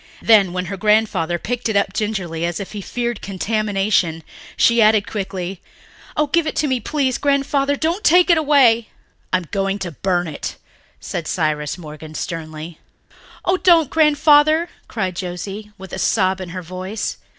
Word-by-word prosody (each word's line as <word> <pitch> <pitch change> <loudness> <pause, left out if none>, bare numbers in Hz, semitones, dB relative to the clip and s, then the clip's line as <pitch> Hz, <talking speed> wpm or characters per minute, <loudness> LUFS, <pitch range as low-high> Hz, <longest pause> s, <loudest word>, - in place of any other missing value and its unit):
Then, 205 -5 +5
when 180 0 -3
her 195 +2 -5
grandfather 205 -5 +2
picked 245 +5 -3
it 220 - -1
up 200 -1 +1
gingerly, 185 -7 -2
as 170 -1 -2
if 200 - -6
he 210 - -6
feared 240 +2 -3
contamination, 195 -4 0 0.3
she 235 0 +4
added 215 -1 +4
quickly, 190 -3 -5 0.6
"Oh, 300 - +3
give 320 +2 +1
it - - -3
to - - +1
me, 260 -2 0
please, 265 +1 -1
Grandfather. 280 0 +1
Don't 330 +7 -1
take 355 +2 +5
it 340 - +5
away." 260 -7 +4 0.4
"I 185 - +4
am 180 - -6
going 195 0 0
to 185 -3 -5
burn 175 +2 -1
it," 155 - -5 0.4
said 170 -3 -5
Cyrus 155 -3 -1
Morgan 155 -2 -10
sternly. 160 -1 -6 0.7
"Oh, 365 - +2
don't, 335 -6 +4
Grandfather," 310 +1 +4 0.2
cried 190 -5 -3
Joscelyn, 195 +4 -6
with 190 0 -11
a 190 - -4
sob 190 -2 +1
in 185 - -6
her 180 +1 -6
voice. 185 +5 -5
200 Hz, 165 wpm, -20 LUFS, 180-260 Hz, 0.7 s, Then